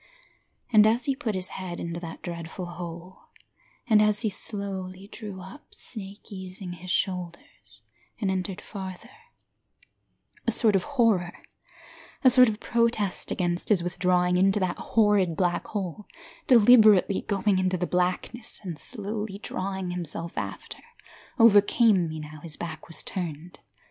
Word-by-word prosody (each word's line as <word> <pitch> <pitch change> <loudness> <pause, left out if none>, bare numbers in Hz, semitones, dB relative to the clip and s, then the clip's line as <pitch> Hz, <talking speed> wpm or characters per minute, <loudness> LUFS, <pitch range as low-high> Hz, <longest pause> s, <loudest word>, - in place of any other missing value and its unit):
And 215 0 +8
as 235 +3 +1
he 275 - +1
put 225 -6 -3
his 185 0 -1
head 180 -2 -6
into 170 0 -4
that 165 -2 -8
dreadful 170 +1 -6
hole, 175 +1 -9 0.6
And 215 -3 +5
as 210 0 +3
he 220 -3 0
slowly 195 -2 -5
drew 205 -4 -8
up, 190 +11 -12
snake 205 -1 -6
easing 185 -1 -7
his 180 +1 -10
shoulders, 180 -2 -4 0.4
and 200 -4 0
entered 185 0 -3
further, 190 -3 -8 1.4
A - - +4
sort 220 -2 +3
of 190 - +3 0.2
horror, 195 -8 +2 0.9
a 255 - +7
sort 250 -1 +7
of 210 0 -4
protest 230 -6 0
against 175 -1 -1
his 195 -5 +3
withdrawing 180 0 +1
into 195 +2 +3
that 185 -2 -1
horrid 205 -6 +2
black 175 -2 0
hole, 200 -1 -5 0.4
Deliberately 215 -5 +6
going 200 -1 +1
into 185 0 +1
the 180 - -1
blackness, 180 +6 -2
and 170 -5 -6
slowly 210 -3 -5
drawing 190 -2 -4
himself 170 -1 -3
after, - - -5 0.6
Overcame 210 -4 +5
me 155 0 -5
now 155 0 -9
his 160 -2 -8
back 160 -2 -7
was 165 - -5
turned. 170 -2 -5
190 Hz, 140 wpm, -26 LUFS, 175-210 Hz, 1.4 s, And